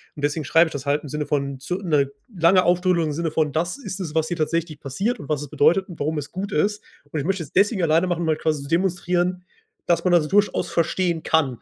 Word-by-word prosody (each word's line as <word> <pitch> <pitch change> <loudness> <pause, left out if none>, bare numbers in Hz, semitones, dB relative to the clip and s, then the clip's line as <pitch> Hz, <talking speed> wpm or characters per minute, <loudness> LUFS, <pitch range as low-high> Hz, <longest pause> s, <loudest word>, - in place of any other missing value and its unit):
Und 145 - -9
deswegen 145 0 -1
schreibe 165 +3 +5
ich - - -8
das 140 -1 -6
halt 145 +1 +1
im 145 - -8
Sinne 150 +1 -3
von 140 -2 -2
zu 180 +7 -3
'ne 150 -7 +1 0.2
lange 180 +1 +4
Ausführung 180 -1 +2
im - - -2
Sinne 165 +1 -2
von: 155 -2 +1
„Das 170 - -1
ist 200 -7 -6
es, 160 -4 -5
was 160 0 +2
hier 175 - -2
tatsächlich 160 -1 -1
passiert 195 - -2
und 145 - -9
was 150 -2 -1
es 145 - -7
bedeutet 175 +6 +3
und 170 - -10
warum 155 +2 -1
es 145 - -5
gut 195 +2 -5
ist.“ 205 +7 +1 0.3
Und 155 - -2
ich 140 - -3
möchte 190 -2 -1
es 140 - -13
deswegen 200 0 +2
alleine 165 +3 +3
machen, 175 -1 -1
um 165 - -1
halt 155 - +1
quasi 155 -2 0
zu 140 - -9
demonstrieren, 180 0 0 0.4
dass 170 - +2
man 180 - +3
das 160 -3 +4
durchaus 205 +1 +2
verstehen 170 0 0
kann. 140 -7 +1
165 Hz, 260 wpm, -23 LUFS, 150-180 Hz, 0.4 s, schreibe